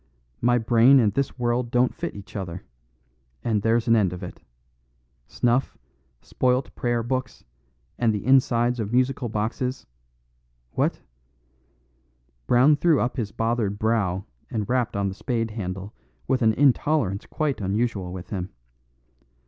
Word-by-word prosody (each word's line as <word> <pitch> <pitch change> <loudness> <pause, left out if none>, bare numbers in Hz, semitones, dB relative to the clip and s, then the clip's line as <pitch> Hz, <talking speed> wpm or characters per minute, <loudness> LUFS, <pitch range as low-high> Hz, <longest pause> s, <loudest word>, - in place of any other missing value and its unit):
"My 120 +1 +3
brain 120 +3 +5
and 105 -4 +2
this 140 -1 -1
world 120 0 0
don't 125 +1 +2
fit - - -5
each 100 +1 -11
other; 90 -3 -5 0.8
and 110 -3 +1
there's 115 +2 +1
an 115 - +5
end 100 -5 +2
of 90 +1 -7
it. 90 - -9 0.9
Snuff, 125 +2 0 0.5
spoilt 125 +1 0
Prayer 120 -1 -1
Books, 130 +1 -3 0.6
and 115 -1 +3
the 105 -2 -3
insides 125 -2 +3
of 105 -1 -3
musical 125 0 +1
boxes 115 +5 -2 0.9
what - - -1 0.8
" - - -42
Brown 135 +5 +5
threw 160 -1 +3
up 125 +3 -1
his 110 -5 -2
bothered 115 -3 -1
brow 105 -4 0 0.2
and 105 -3 -3
rapped 125 -4 0
on 100 -1 0
the 95 - -3
spade 115 +2 -2
handle 95 -1 -5 0.3
with 130 0 +1
an 110 -1 +4
intolerance 135 -6 +2
quite 150 -7 -2
unusual 100 -2 -1
with 90 -1 -8
him. 95 -2 -3
115 Hz, 140 wpm, -24 LUFS, 100-125 Hz, 0.9 s, brain